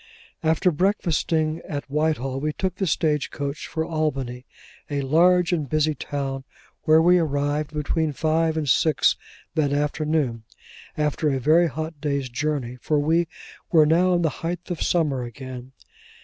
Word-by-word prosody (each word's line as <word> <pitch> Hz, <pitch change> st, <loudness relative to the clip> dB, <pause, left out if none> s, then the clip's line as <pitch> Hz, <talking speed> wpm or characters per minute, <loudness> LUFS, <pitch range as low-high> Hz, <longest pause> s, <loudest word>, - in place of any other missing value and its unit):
After 160 Hz, +3 st, +2 dB
breakfasting 165 Hz, -3 st, 0 dB
at 145 Hz, -2 st, -4 dB
Whitehall, 140 Hz, -3 st, -1 dB
we 150 Hz, +2 st, -2 dB
took 185 Hz, +1 st, -3 dB
the 190 Hz, -, -1 dB
stage 150 Hz, -5 st, +1 dB
coach 140 Hz, +1 st, -5 dB
for 160 Hz, -1 st, -2 dB
Albany: 135 Hz, -6 st, -2 dB, 0.4 s
a 145 Hz, -1 st, -1 dB
large 175 Hz, +5 st, +4 dB
and 150 Hz, -6 st, -1 dB
busy 155 Hz, 0 st, +2 dB
town, 135 Hz, -1 st, -4 dB, 0.4 s
where 155 Hz, +1 st, +6 dB
we 175 Hz, +2 st, +5 dB
arrived 145 Hz, -1 st, -1 dB
between 155 Hz, +1 st, -1 dB
five 160 Hz, +2 st, +1 dB
and 155 Hz, -2 st, -1 dB
six 155 Hz, +3 st, +3 dB, 0.4 s
o'clock 150 Hz, -3 st, +2 dB
that -, -, -2 dB
afternoon; 150 Hz, -4 st, 0 dB, 0.6 s
after 150 Hz, 0 st, 0 dB
a 135 Hz, -2 st, 0 dB
very 160 Hz, +6 st, +4 dB
hot 155 Hz, -1 st, -5 dB
day's 140 Hz, -3 st, -1 dB
journey, 130 Hz, -2 st, -2 dB
for 150 Hz, -, +1 dB
we 165 Hz, +3 st, +2 dB, 0.4 s
were 155 Hz, -3 st, +6 dB
now 175 Hz, +4 st, +3 dB
in 175 Hz, -, +1 dB
the 160 Hz, -, +3 dB
height 175 Hz, +2 st, -4 dB
of 170 Hz, -, -4 dB
summer 150 Hz, -7 st, +1 dB
again. 125 Hz, +1 st, -8 dB
155 Hz, 155 wpm, -24 LUFS, 140-165 Hz, 0.6 s, where